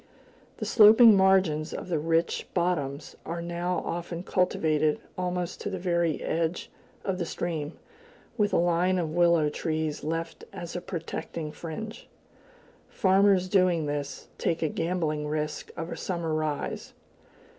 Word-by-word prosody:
The -, -, -4 dB
sloping 220 Hz, 0 st, +8 dB
margins 190 Hz, -5 st, +3 dB
of -, -, -6 dB
the 170 Hz, -4 st, 0 dB
rich 165 Hz, +2 st, 0 dB
bottoms 160 Hz, -6 st, -1 dB
are 170 Hz, +1 st, -4 dB
now 175 Hz, +1 st, -2 dB
often 170 Hz, 0 st, -4 dB
cultivated 155 Hz, -5 st, +1 dB, 0.2 s
almost 180 Hz, -1 st, -3 dB
to -, -, -3 dB
the 190 Hz, -, -3 dB
very 170 Hz, -3 st, 0 dB
edge 165 Hz, +1 st, -2 dB, 0.3 s
of 190 Hz, -2 st, -1 dB
the 175 Hz, -, -1 dB
stream, 160 Hz, -3 st, -3 dB, 0.6 s
with 210 Hz, -3 st, +1 dB
a -, -, +1 dB
line 175 Hz, +2 st, +2 dB
of 165 Hz, -3 st, -1 dB
willow 170 Hz, -2 st, +4 dB
trees 155 Hz, -1 st, -2 dB
left 165 Hz, +2 st, -3 dB
as 175 Hz, 0 st, -7 dB
a 175 Hz, -, -3 dB
protecting 165 Hz, -3 st, -5 dB
fringe. 195 Hz, +8 st, -7 dB, 0.8 s
Farmers 190 Hz, -1 st, +3 dB
doing 180 Hz, -4 st, +3 dB
this 145 Hz, -2 st, -4 dB
take 165 Hz, -1 st, 0 dB
a 155 Hz, -, +1 dB
gambling 160 Hz, -3 st, -1 dB
risk 150 Hz, 0 st, -3 dB
of 165 Hz, +1 st, -4 dB
a -, -, -3 dB
summer 170 Hz, -3 st, -2 dB
rise. 155 Hz, -2 st, -3 dB
170 Hz, 140 wpm, -27 LUFS, 155-180 Hz, 0.8 s, sloping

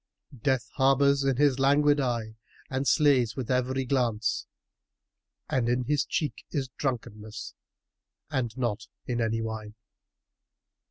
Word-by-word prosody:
Death 130 Hz, -1 st, 0 dB
harbours 140 Hz, +1 st, +4 dB
in 135 Hz, -1 st, +2 dB
his 140 Hz, -2 st, +3 dB
languid 145 Hz, +2 st, +4 dB
eye 115 Hz, -4 st, -1 dB, 0.4 s
and 135 Hz, +1 st, -1 dB
slays 130 Hz, -7 st, +4 dB
with 130 Hz, -2 st, -3 dB
every 130 Hz, +1 st, 0 dB
glance, 120 Hz, -4 st, 0 dB, 0.5 s
* -, -, -59 dB
And 120 Hz, -3 st, 0 dB
in 125 Hz, +1 st, +1 dB
his 145 Hz, +2 st, +1 dB
cheek 150 Hz, -, -2 dB
is 135 Hz, -5 st, -2 dB
drunkenness, 110 Hz, -4 st, -5 dB, 0.8 s
and 120 Hz, -4 st, 0 dB
not 115 Hz, -3 st, -2 dB, 0.2 s
in 120 Hz, -1 st, -1 dB
any 115 Hz, 0 st, 0 dB
wine." 110 Hz, -1 st, -5 dB
130 Hz, 125 wpm, -28 LUFS, 115-135 Hz, 0.8 s, harbours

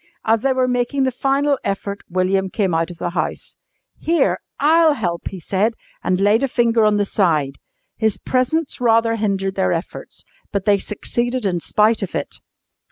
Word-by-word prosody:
As 225 Hz, 0 st, +2 dB
they 270 Hz, -, +1 dB
were 255 Hz, -1 st, +1 dB
making 250 Hz, +2 st, 0 dB
the 260 Hz, -, +1 dB
final 275 Hz, +2 st, +1 dB
effort 200 Hz, 0 st, -3 dB
William 185 Hz, +1 st, 0 dB
came 190 Hz, -3 st, -1 dB
out 165 Hz, +1 st, 0 dB
of 175 Hz, -, -10 dB
the 175 Hz, +1 st, -3 dB
house. -, -, -3 dB, 0.5 s
"Here, 335 Hz, +1 st, +1 dB, 0.2 s
I'll 315 Hz, +2 st, +5 dB
help!" 175 Hz, -8 st, -3 dB
he 190 Hz, -, -8 dB
said, 205 Hz, +7 st, 0 dB, 0.3 s
and 180 Hz, 0 st, +1 dB
laid 205 Hz, +4 st, +3 dB
a 275 Hz, -, +2 dB
finger 230 Hz, -3 st, +2 dB
on 210 Hz, -1 st, +3 dB
the 205 Hz, -, +1 dB
side. 155 Hz, -9 st, 0 dB, 0.4 s
His 220 Hz, -3 st, +1 dB
presence 260 Hz, -, -1 dB
rather 230 Hz, -1 st, +3 dB
hindered 195 Hz, -3 st, -1 dB
their 190 Hz, -1 st, 0 dB
efforts, 170 Hz, +1 st, -5 dB, 0.3 s
but 200 Hz, -2 st, -2 dB
they 205 Hz, -2 st, +4 dB
succeeded 240 Hz, +4 st, -2 dB
in 180 Hz, -3 st, 0 dB
spite 215 Hz, +6 st, +2 dB
of 195 Hz, -, -4 dB
it. -, -, -4 dB
210 Hz, 175 wpm, -20 LUFS, 190-250 Hz, 0.5 s, I'll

